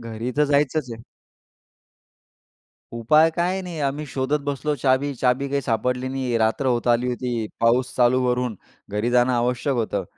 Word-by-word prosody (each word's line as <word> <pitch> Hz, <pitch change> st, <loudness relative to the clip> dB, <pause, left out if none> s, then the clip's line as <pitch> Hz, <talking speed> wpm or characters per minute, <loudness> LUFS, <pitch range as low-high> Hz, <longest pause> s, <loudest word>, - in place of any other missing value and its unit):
घरी 115 Hz, +1 st, -5 dB
तर 150 Hz, -, +4 dB
जायचंच 145 Hz, -1 st, +1 dB
आहे. 115 Hz, 0 st, -10 dB, 1.9 s
उपाय 150 Hz, +8 st, +4 dB
काय 180 Hz, +2 st, 0 dB
नाही 175 Hz, -3 st, -7 dB
आम्ही 145 Hz, +1 st, -2 dB
शोधत 135 Hz, +2 st, -1 dB
बसलो 145 Hz, +1 st, -2 dB
चाबी. 135 Hz, +1 st, +1 dB
चाबी 130 Hz, +2 st, +1 dB
काही 140 Hz, 0 st, 0 dB
सापडली 125 Hz, +1 st, -1 dB
नाही. 130 Hz, -3 st, -1 dB
रात्र 110 Hz, +4 st, 0 dB
होत 120 Hz, -1 st, 0 dB
आली 120 Hz, +1 st, +2 dB
होती. 120 Hz, -3 st, -3 dB
पाऊस 120 Hz, +2 st, +2 dB
चालू 125 Hz, +1 st, +3 dB
वरून, 125 Hz, -2 st, -1 dB, 0.3 s
घरी 105 Hz, +4 st, -1 dB
जाणं 125 Hz, +1 st, +3 dB
आवश्यक 125 Hz, +3 st, 0 dB
होतं. 105 Hz, -4 st, -1 dB
125 Hz, 155 wpm, -23 LUFS, 120-140 Hz, 1.9 s, तर